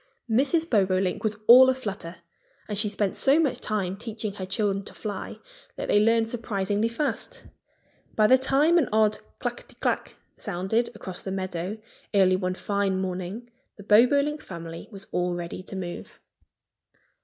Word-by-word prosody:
Mrs. 280 +8 +2
Bobolink 190 - +1
was 215 -1 0
all 255 +3 +9
a 260 - +2
flutter. 200 -8 -6 0.5
And 210 - -3
she 210 +1 +2
spent 205 -1 -1
so 280 +3 +4
much 300 -5 0
time 195 -4 -1
teaching 215 -1 -4
her 190 -2 -6
children 195 0 0
to - - -12
fly 205 -3 -6 0.4
that - - -5
they 205 - +5
learned 225 +1 +3
surprisingly 210 -2 -1
fast. 235 +6 -3 0.7
By 215 - +4
the 255 +4 +6
time 295 +6 +4
an 280 - 0
odd 215 0 +3 0.2
clackety - - -5
clack - - -1 0.2
sounded 190 +7 -1
across 185 -4 -7
the 190 - -5
meadow 185 +1 -3 0.4
early 185 -2 +5
one 185 -1 -2
fine 200 -1 -1
morning 190 +5 -4 0.3
the 205 - -11
Bobolink 280 +8 +4
family 165 -2 -8
was 195 -2 -8
all 180 0 0
ready 175 +1 -5
to 190 - -9
move. 175 -2 -7
205 Hz, 155 wpm, -26 LUFS, 190-235 Hz, 0.7 s, all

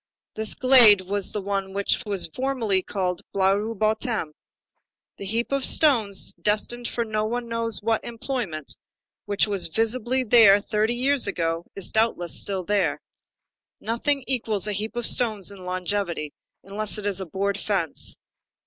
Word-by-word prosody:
This 220 -1 -2
glade 245 -7 +7
was 195 +1 -1
the 210 - -3
one 195 -1 -3
which 200 +4 0
was 200 -3 0
formerly 240 -7 0
called 185 -2 -3
the - - -12
Blaru 200 +4 +1
bottom. 215 -5 0 0.8
The 200 - -7
heap 230 +5 -1
of 275 -1 0
stones, 230 - +3
destined 230 +3 0
for 235 - -2
no 215 -1 -2
one 240 +2 -3
knows 230 -2 -1
what 225 0 0
employment, 230 - -4 0.5
which 205 0 +2
was 200 -3 0
visible 235 +7 0
there 210 -3 +7
thirty 215 +3 -1
years 265 0 +1
ago, 165 -3 -2
is 195 - 0
doubtless 220 -6 0
still 195 -2 -3
there. 205 +2 0 0.8
Nothing 275 +5 0
equals 220 -7 -1
a 210 - -2
heap 215 +3 -4
of 240 -1 -1
stones 215 -6 +2
in 190 -2 -11
longevity, 180 -4 -3 0.3
unless 205 +3 -3
it 210 - -6
is 195 -2 -1
a 190 - -6
board 200 +4 -2
fence. 190 -8 -2
210 Hz, 155 wpm, -24 LUFS, 195-230 Hz, 0.8 s, glade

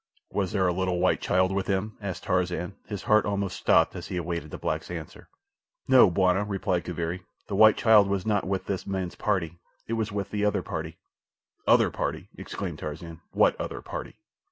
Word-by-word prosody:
"Was 95 -3 -1
there 95 -3 +2
a 90 - +2
little 90 0 0
white 95 - +2
child 95 +1 +2
with 95 0 -1
him?" 100 +2 -1
asked 100 -3 -5
Tarzan, 90 +1 -1
his 105 -3 -5
heart 110 0 +4
almost 100 -2 -2
stopped - - +3
as - - -6
he 90 - -4
awaited 85 -3 -3
the - - -7
black's - - -3
answer. 80 -4 -8 0.6
"No, 130 -6 +7
bwana," 95 +2 +2
replied 95 -3 -1
Kaviri, 85 +1 -3 0.2
"the 100 - -4
white 110 +1 +7
child 110 -3 +6
was 100 -2 -1
not 105 -3 +1
with 95 0 -2
this 95 -2 -3
man's 95 -2 -2
party—it 95 0 -3
was 110 -1 -1
with 100 -1 -3
the 105 -1 -1
other 105 -1 +1
party." - - -5 0.7
"Other - - +5
party!" - - -3
exclaimed - - -6
Tarzan. 80 +2 -7
"What - - +4
other - - -5
party?" - - -6
95 Hz, 185 wpm, -27 LUFS, 90-105 Hz, 0.7 s, No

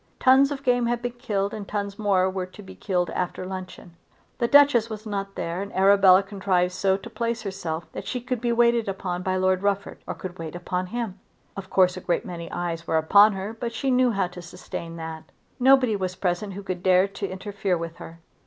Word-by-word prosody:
Tons 270 +2 +5
of 275 -1 -5
game 245 -2 +2
had 240 0 -1
been 245 - -1
killed, 210 -5 -2
and 205 -2 -6
tons 200 -1 -4
more 195 -3 +2
were 185 -1 -3
to 205 +3 -13
be - - -11
killed 180 -3 -1
after 180 0 -3
luncheon. 185 -2 -8 0.4
The 235 - +2
Duchess 280 -5 +5
was 215 0 -7
not 195 -2 -4
there 170 +3 -3
and 200 - -6
Arabella 195 0 +6
contrived 190 -2 0
so 190 +1 +1
to 200 - -10
place 230 0 -3
herself 175 -5 -4
that - - -7
she 250 - -2
could 245 -1 -3
be 240 -1 0
waited 235 -2 +3
upon 180 -2 -3
by 185 0 -1
Lord 185 0 +2
Rufford, 200 0 -1
or - - -4
could 185 -1 -8
wait 165 0 -6
upon 180 +1 -3
him. 220 -2 -4 0.4
Of 190 -1 -7
course 185 -1 +3
a - - -6
great 175 - -1
many 170 -1 -7
eyes 170 -1 -4
were 160 - +2
upon 200 +7 +6
her, 195 +3 -5
but 235 0 -5
she 270 +2 -1
knew 250 0 +4
how 200 -4 +1
to 180 0 -10
sustain 170 -1 -8
that. 160 -1 -7 0.3
Nobody 255 -3 +5
was 185 -2 -3
present 185 +2 -2
who 200 +2 -7
could 185 -2 -4
dare 185 +1 +4
to 200 0 -5
interfere 195 -1 -2
with 165 0 -6
her. 165 0 -11
195 Hz, 220 wpm, -25 LUFS, 180-225 Hz, 0.4 s, Arabella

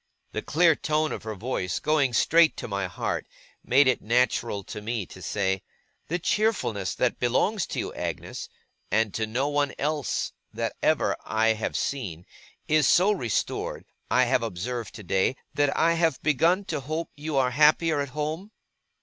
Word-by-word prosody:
The - - -3
clear 165 0 +4
tone 155 +1 0
of - - -4
her 110 -1 -5
voice, 95 -4 -2
going 145 -4 +1
straight 165 +7 +4
to - - -5
my 100 -3 -2
heart, 85 - -3 0.4
made 135 +2 +4
it 130 - +2
natural 115 -3 +1
to 105 - -7
me 110 -2 -3
to 95 - -13
say: 95 -1 -1 0.5
'The 175 - -1
cheerfulness 180 - 0
that 125 - 0
belongs 170 - +1
to - - -5
you, - - -3
Agnes - - -5 0.4
(and 110 -1 +1
to 110 -1 -1
no 125 +6 0
one 145 -1 0
else 150 -1 -1 0.2
that - - -3
ever - - +2
I 110 +1 +2
have 110 -1 -1
seen), 90 - -3 0.4
is 155 -3 +4
so 190 +4 +5
restored, 120 - -2 0.2
I 125 - +4
have 125 0 +2
observed 115 +3 -4
today, 95 +3 0 0.2
that 145 -1 +1
I 165 +1 +4
have 165 -4 +1
begun 165 +7 +3
to 185 - -2
hope 155 +5 -4
you 150 -1 -3
are 130 -2 +3
happier 150 +2 +4
at 140 - -3
home? 155 +7 -4
130 Hz, 165 wpm, -26 LUFS, 110-155 Hz, 0.5 s, so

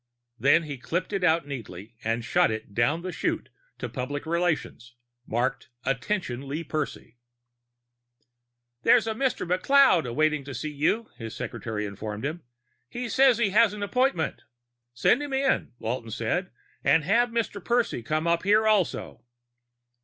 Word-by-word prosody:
Then 145 +5 +5
he 145 -4 -6
clipped 180 +10 -3
it 195 -2 -1
out 165 -3 +3
neatly 115 -6 -8
and 115 +1 -1
shot - - +3
it 110 -2 -5
down 145 +10 +1
the 185 - -3
chute - - -2 0.3
to - - -4
public 145 +3 -4
relations, 160 -8 -1 0.3
marked 120 +3 -1 0.2
Attention: 135 -1 -2
Lee 150 +4 -3
Percy. 150 -5 -5 1.6
"There's 230 - +5
a 220 - -1
Mr. 255 -5 -1
McLeod 180 - +4
waiting 155 -1 +2
to 140 -2 -7
see 155 +6 -4
you," 155 +10 0
his 115 -3 -7
secretary 105 -2 -4
informed 105 +3 -5
him. 160 +4 -3 0.5
"He 245 - -4
says 265 -1 +5
he 225 -5 +1
has 215 0 +5
an 205 - -5
appointment." 205 - 0 0.5
"Send 240 - +3
him 290 -2 -5
in," 270 +1 +1
Walton 115 0 -4
said. 125 - -1 0.3
"And 160 - +4
have 230 +9 +3
Mr. 230 -3 -2
Percy 240 - +1
come 155 +7 -1
up 170 0 +2
here 210 +3 +3
also." 210 -5 +1
160 Hz, 150 wpm, -26 LUFS, -, 1.6 s, Then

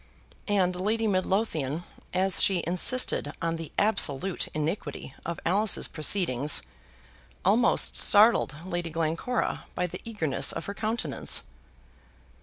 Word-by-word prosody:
And 190 -4 +1
Lady 215 +5 -1
Midlothian, 185 -6 -1 0.3
as 190 +1 +2
she 185 -3 +2
insisted 180 - +2
on 165 0 -2
the 165 -2 -8
absolute 195 -4 +1
iniquity 155 -3 -4
of 170 -1 -4
Alice's 200 +4 +2
proceedings, 155 -4 +1 0.8
almost 220 +6 +3
startled 210 -6 +4
Lady 175 -2 -4
Glencora 165 +9 -2
by 180 - -1
the 175 - -7
eagerness 170 -12 0
of - - -5
her 200 - -5
countenance. 215 - -1
180 Hz, 110 wpm, -27 LUFS, 160-205 Hz, 0.8 s, startled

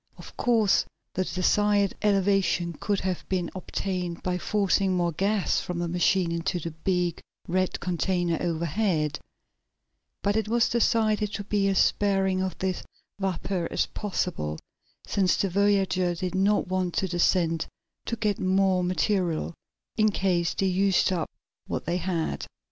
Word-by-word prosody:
Of - - -12
course 225 -5 +3 0.3
the 185 - 0
desired 200 +2 +2
elevation 195 -4 +2
could 200 +5 -1
have 185 -1 -2
been 180 -3 -1
obtained 180 -2 -3
by 180 0 -1
forcing 195 -1 +1
more 175 -1 +1
gas 195 +4 +1
from 180 - -4
the 175 0 -1
machine 175 +1 +2
into 170 +2 -1
the 165 0 -5
big, 175 +1 -1 0.3
red 185 +1 0
container 175 -1 0
overhead, 165 -2 0 1.0
but 205 0 +1
it 220 -1 0
was 235 +1 +2
decided 215 -3 +2
to 205 - -3
be 200 -1 +1
as 195 -1 +1
sparing 195 -2 +2
of 190 -1 -3
this 185 -1 -2 0.4
vapor 190 -2 -1
as - - +1
possible, 180 - -3 0.5
since 190 -2 +2
the 195 - 0
voyagers 190 -3 +2
did 185 0 -2
not 195 +2 +2
want 185 -1 -1
to 190 - +1
descend 170 -2 +1 0.4
to 230 - -2
get 210 -3 -1
more 190 -1 +2
material, 180 -2 0 0.4
in 215 -1 +4
case 180 -4 0
they 195 - 0
used 190 0 +2
up 170 -3 -2 0.4
what - - -3
they 170 +2 0
had. 170 - -2
185 Hz, 145 wpm, -27 LUFS, 175-200 Hz, 1.0 s, in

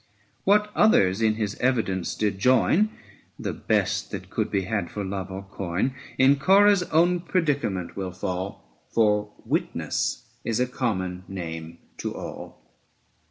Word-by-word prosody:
What 210 +1 +4
others 100 - +4
in 110 -1 +3
his 105 -2 -2
evidence 110 -8 0
did 105 -2 -1
join, 140 - +4 0.5
The - - -3
best - - 0
that - - -7
could - - -1
be 100 - +1
had 100 -3 -2
for 105 - -4
love 95 0 -4
or 95 +1 -6
coin, 95 +5 -2 0.2
In 135 +2 +5
Corah's 200 +4 +6
own 175 +2 +3
predicament 145 - -1
will 95 -2 -3
fall, 90 -9 -5
680 - - -36
For 105 -2 +2
Witness - - -1 0.2
is 115 0 -1
a 125 - +3
common 95 -8 -2
name 85 -3 -6 0.2
to - - -4
all. - - -9
105 Hz, 145 wpm, -25 LUFS, 95-130 Hz, 0.5 s, Corah's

